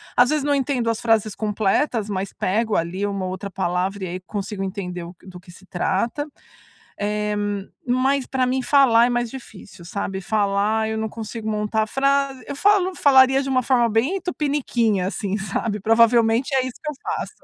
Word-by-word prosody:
Às 245 0 +5
vezes 300 -2 0
não 290 0 +1
entendo 260 -3 -1
as 230 0 -1
frases 225 -2 +2
completas, 215 +2 0
mas 195 -1 -3
pego 215 +3 0
ali 170 +4 -1
uma 200 -2 -2
ou 185 - -3
outra 190 +2 -5
palavra 185 +2 -2
e - - -4
aí 180 +1 -5
consigo 200 +1 -5
entender 185 -2 -5
o 170 +2 -10
do 180 -2 -11
que 180 0 -15
se 185 +2 -16
trata. 200 - -1 0.7
Eh, 210 0 -1 0.5
mas 260 +2 +1
pra 260 -1 0
mim 260 +1 0
falar 245 -4 +5
é - - 0
mais 240 -1 -1
difícil, 205 -8 -11
sabe. 190 +1 -4
Falar 210 +2 +1
eu 220 0 -2
não 220 0 -2
consigo 220 0 -6
montar 215 0 0
frase 275 +1 0
eu 280 - -5
falo 390 +2 +3
falaria 265 -1 +5
de 275 - -5
uma 255 -1 +2
forma 240 -2 +3
bem 250 - +1
tupiniquim 275 - 0
assim, 195 +1 -2
sabe. 205 +2 -2
Provavelmente 230 +4 +3
é 260 - +3
isso 255 - -8
que 300 - -2
eu - - -8
faço, - - -4
220 Hz, 185 wpm, -22 LUFS, 200-260 Hz, 0.7 s, Às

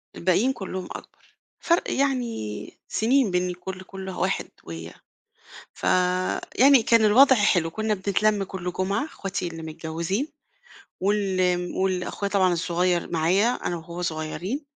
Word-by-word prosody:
الباقيين 195 +9 +2
كلّهم 190 -5 -5
أكبر، - - -12 0.2
فرْق 340 0 +1
يعني 245 - -2
سنين 245 -1 +2
بين 180 0 +1
ال 180 0 -6
كلّ 185 +1 -6
كلّ 190 0 -8
واحد 185 - -1
ويا 80 0 -8 0.8
فيعني 185 +8 +3
كان 230 -1 +4
الوضع 260 +6 +7
حلو 185 -7 +2
كنا 220 +3 -1
بنتلَم 200 +1 +1
كلّ 185 -2 -5
جمعة 195 +10 -1
إخواتي 195 - -4
اللي 165 -1 -7
متجوزين 165 - -3 0.7
وال 195 -1 +1
آمم 180 -1 0
وال 185 -1 0
أخويا 200 +2 -3
طبعًا 190 -3 +3
الصغيّر 175 +1 0
معايا 175 +6 +2
أنا 210 -7 -2
وهو 170 +1 -7
صغيّرين 170 - -3
185 Hz, 135 wpm, -25 LUFS, 175-215 Hz, 0.8 s, الوضع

